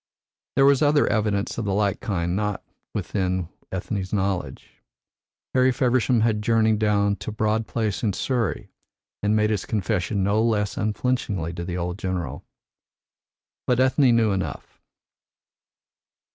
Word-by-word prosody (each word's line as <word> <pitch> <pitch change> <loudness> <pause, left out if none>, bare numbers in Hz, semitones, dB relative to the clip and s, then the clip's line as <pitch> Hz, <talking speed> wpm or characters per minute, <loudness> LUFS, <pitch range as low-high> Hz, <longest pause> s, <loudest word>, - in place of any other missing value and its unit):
There 135 - +5
was 140 -1 +5
other 145 -1 +4
evidence 105 -1 0
of 115 - -2
the 95 -1 0
like 100 -1 +1
kind 85 -3 -1
not 105 -1 -2 0.3
within 95 -3 -2 0.2
Ethne's 95 0 -3
knowledge. 95 -9 -3 0.7
Harry 130 0 +4
Feversham 125 -1 +2
had 110 -2 +1
journeyed 110 -1 +2
down 100 -1 +2
to - - -6
Broad 110 +1 0
Place 110 -4 -2
in 110 - +1
Surrey 120 0 -2 0.5
and 105 +1 +2
made 105 0 +2
his 105 -3 -1
confession 100 -1 -1
no 100 +3 +2
less 105 -3 +1
unflinchingly 105 -6 -1
to 85 0 -5
the 90 0 -4
old 90 +2 -3
general. 95 -2 -3 1.2
But 125 -1 +2
Ethne 130 -1 +4
knew 110 -2 +3
enough. 95 -1 -4
105 Hz, 135 wpm, -24 LUFS, 95-115 Hz, 1.2 s, There